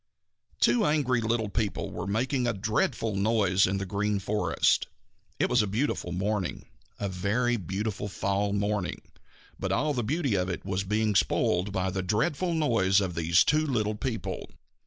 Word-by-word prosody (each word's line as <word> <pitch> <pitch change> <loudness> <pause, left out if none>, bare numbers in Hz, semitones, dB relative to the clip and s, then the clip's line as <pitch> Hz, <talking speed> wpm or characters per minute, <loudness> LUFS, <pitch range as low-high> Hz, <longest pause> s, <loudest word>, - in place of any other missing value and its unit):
_ - - -45
Two 235 - +4
angry 140 - +2
little 110 -1 0
people 105 0 -2
were - - -5
making 125 +5 0
a 120 - +1
dreadful 105 +1 -1
noise 100 -3 +3
in 95 +1 0
the 100 - -3
Green 100 +2 -1
Forest. 105 +2 +1 0.5
It - - +2
was 125 -1 +3
a 105 - -1
beautiful 105 -3 -1
morning, 95 +1 -2 0.3
a 100 - -1
very 100 +7 0
beautiful 100 +2 -3
fall 100 0 -1
morning, 100 -2 -1 0.6
but - - -2
all 150 +5 +1
the 125 - -1
beauty 140 +1 0
of 90 -1 0
it 90 - -4
was 95 0 -1
being 105 +2 +1
spoiled 95 -1 +1
by 95 -1 -1
the 95 0 -2
dreadful 135 - 0
noise 115 -11 +2
these 85 -3 +3
two 155 +1 +2
little 110 -6 0
people. 115 +1 -4
105 Hz, 165 wpm, -28 LUFS, 95-120 Hz, 0.6 s, Two